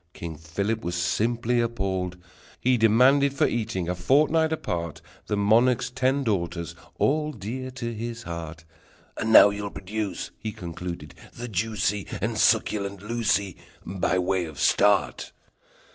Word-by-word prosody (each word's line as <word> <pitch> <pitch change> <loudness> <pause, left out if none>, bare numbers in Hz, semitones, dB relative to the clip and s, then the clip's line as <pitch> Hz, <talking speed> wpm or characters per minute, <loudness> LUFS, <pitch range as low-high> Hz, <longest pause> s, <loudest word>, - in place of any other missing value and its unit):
King 85 -2 -6
Philip 100 +8 -3
was 85 +1 -2
simply 115 +7 +1
appalled! 95 -6 -2 0.4
He 130 +1 +3
demanded 130 +5 +4
for - - +3
eating, 110 -6 -2
a 90 - 0
fortnight 155 - +3
apart, 85 - -3 0.3
The 105 - -1
monarch's 115 +5 +3
ten 130 +2 +1
daughters, 85 -6 -2 0.2
all 150 +1 +1
dear 130 +2 -6
to 120 -2 -5
his 115 +1 -5
heart. 85 -1 -7 0.5
"And 110 - -2
now 105 -2 +9
you'll 100 0 -4
produce," 100 +1 -4
he 110 -1 -5
Concluded, 85 -4 -7 0.2
"the 120 +1 -6
juicy 105 -1 -1
And 110 +2 -2
succulent 100 -3 +1
Lucie 105 -4 0 0.3
By 95 0 0
way 90 0 0
of 80 -3 -10
start!" 100 -2 +2
105 Hz, 135 wpm, -25 LUFS, 90-120 Hz, 0.5 s, now